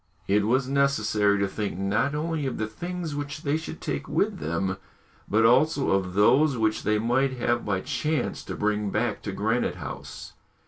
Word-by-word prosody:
It 105 +1 +2
was 130 +2 +2
necessary 110 -7 +2
to 100 0 +1
think 100 -2 -4
not 105 +9 0
only 155 -2 -1
of 130 - -3
the 110 - -1
things 175 +8 -5
which 145 +1 -5
they 145 +1 +1
should 160 0 -5
take - - -4
with - - 0
them, 85 +5 -2 0.5
but 110 +2 +3
also 140 +4 +4
of 95 -1 0
those 130 +7 +4
which 110 -1 +1
they 105 0 +1
might 120 +5 +1
have 120 0 0
by 100 -2 -1
chance 155 +3 -2
to - - -5
bring 105 -1 0
back - - -1
to - - -4
Granite - - 0
House. - - -8
115 Hz, 180 wpm, -26 LUFS, 105-140 Hz, 0.5 s, also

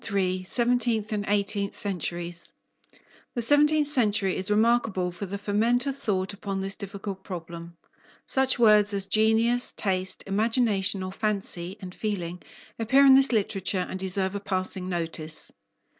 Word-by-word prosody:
III 185 -2 0
SEVENTEENTH 235 -1 +1
AND 210 -1 -3
EIGHTEENTH 200 0 0
CENTURIES 175 -3 -3 0.8
The 240 - -1
seventeenth 295 +3 +4
century 215 -9 +1
is 190 +1 +1
remarkable 215 -4 +1
for 195 +3 -7
the 200 +2 -4
ferment 225 +5 +1
of 275 -1 -2
thought 200 -6 -2
upon 195 -1 -5
this 195 0 -3
difficult 200 -1 -7
problem. 170 -2 -8 0.5
Such 265 -1 +1
words 210 -3 +5
as 195 -1 +2
genius, 225 +4 +2
taste, 190 -2 -1
imagination 205 -2 +1
or 185 - -5
fancy, 195 -3 -3
and 185 -3 -9
feeling, 180 -5 -4 0.4
appear 265 +5 +4
in 270 - +8
this 270 0 +6
literature, 195 -4 -1
and 185 - -6
deserve 190 0 -1
a 200 - -3
passing 185 -1 -3
notice. 165 -2 -3
200 Hz, 145 wpm, -26 LUFS, 185-225 Hz, 0.8 s, in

